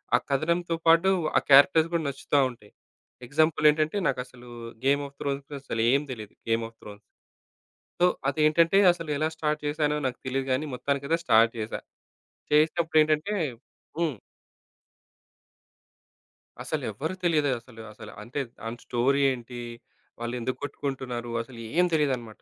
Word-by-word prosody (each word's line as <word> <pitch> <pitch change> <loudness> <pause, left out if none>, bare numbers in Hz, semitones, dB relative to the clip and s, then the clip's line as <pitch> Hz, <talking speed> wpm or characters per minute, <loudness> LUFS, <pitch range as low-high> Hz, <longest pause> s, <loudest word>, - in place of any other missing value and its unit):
ఆ - - +6
కథనంతో 170 +5 0
పాటు 165 +3 +6 0.3
ఆ - - +6
క్యారెక్టర్స్ 160 +4 +7
గూడా 165 -2 0
నచ్చుతా 140 +1 0
ఉంటాయి. 110 -4 -15 0.5
ఎగ్జాంపుల్ 155 +3 +2
ఏంటంటే, 155 +5 -1
నాకసలు 125 -1 -6 0.4
'గేమ్ 140 +1 +3
ఆఫ్ 140 - -19
త్రోన్స్‌' 140 +1 -4
అసలు 115 -4 -3
ఏం 140 - +3
తెలీదు, 110 -4 -10
'గేమ్ 115 0 +1
ఆఫ్ 115 - -28
త్రోన్స్.' 105 -1 -11 1.0
సో, - - +7 0.2
అదేంటంటే, 155 +5 +3
అసలు 165 -2 -6
ఎలా 155 +2 +1
స్టార్ట్ 155 -1 -1
చేసానో 150 0 0
నాకు 125 -1 -2
తెలీదు 130 +1 -1
గానీ, 130 +4 0
మొత్తానికి 140 +2 -2
అయితే 165 +2 +2
స్టార్ట్ 115 -5 +5
జేశా. 110 0 -4 0.7
చేసినప్పుడు 160 +2 +3
ఏంటంటే 155 +6 +1 0.7
హ్మ్. 160 -5 0 2.5
అసలు - - -3
ఎవ్వరూ 160 +6 -4
తెలీదే 155 -5 +2
అసలు, 115 -1 -14
అసలు. 110 0 -11
అంటే 125 +6 -5 0.2
దాని 115 +1 -6
స్టోరీ 130 +3 +1
ఏంటి? 120 -1 -7 0.6
వాళ్ళు 120 +1 -3
ఎందుకు 125 +2 -3
కొట్టుకుంటున్నారు? 130 -4 -4
అసలు 115 0 -11 0.2
ఏం 180 - +6
తెలీదనమాట. 130 -8 -1
140 Hz, 135 wpm, -27 LUFS, 120-155 Hz, 2.5 s, క్యారెక్టర్స్